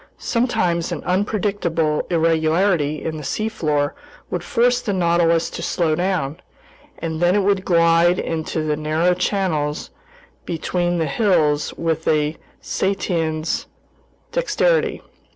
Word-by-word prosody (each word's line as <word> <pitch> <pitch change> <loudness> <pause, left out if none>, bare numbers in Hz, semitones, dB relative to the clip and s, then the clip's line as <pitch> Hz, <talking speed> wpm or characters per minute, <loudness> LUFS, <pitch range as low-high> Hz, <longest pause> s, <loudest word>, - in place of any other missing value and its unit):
Sometimes 180 -9 0
an 170 - -4
unpredictable 180 -5 0
irregularity 165 -1 +1
in 160 -1 -3
the 150 - -7
seafloor 155 -7 -1 0.4
would - - -2
force 245 +1 +2
the 210 -5 -2
Nautilus 170 -2 +2
to - - -6
slow 165 -1 0
down, 175 -3 -1 0.6
and 160 -1 -4
then 175 +2 +4
it 205 - +2
would 195 -1 +2
glide 170 0 +4
into 160 -1 -2
the 155 -1 0
narrow 155 +4 +1
channels 180 -5 -1 0.5
between 175 +1 -1
the 165 - +1
hills 150 -4 +2
with 160 -1 -1
a 150 0 +2 0.3
cetacean's 165 -5 -1 0.6
dexterity. - - +1
170 Hz, 115 wpm, -21 LUFS, 155-190 Hz, 0.6 s, then